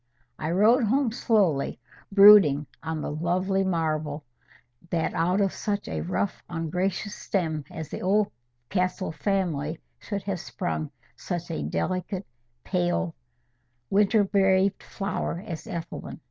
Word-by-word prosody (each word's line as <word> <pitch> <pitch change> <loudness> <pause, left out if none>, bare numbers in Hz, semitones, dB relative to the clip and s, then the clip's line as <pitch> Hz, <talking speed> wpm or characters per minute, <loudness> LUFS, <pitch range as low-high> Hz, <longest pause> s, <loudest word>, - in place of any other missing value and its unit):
I 155 - -2
rode 220 +8 +4
home 255 +2 +2
slowly, 200 - +1 0.3
brooding 195 -8 +8 0.2
on 160 -1 -3
the - - -3
lovely 185 +5 0
marvel, 155 -4 -1 0.7
that 165 -2 0
out 180 +4 +1
of 195 -2 +2
such 205 -1 -2
a - - -3
rough 185 +2 -2
ungracious 180 +5 -2
stem 160 -9 -2
as 160 -2 -7
the - - -6
Oldcastle 180 - -1
family, 165 -5 -1 0.2
should 200 -2 -4
have 195 -2 -2
sprung 160 -3 -3 0.3
such 175 -2 -4
a 75 - -2
delicate, 185 - -2 0.4
pale, 175 -2 0 0.8
winter 205 +2 +4
braved 195 0 +2
flower, 195 -3 -3
as 165 -7 -6
Ethelwyn. 170 0 -6
180 Hz, 120 wpm, -26 LUFS, 160-200 Hz, 0.8 s, brooding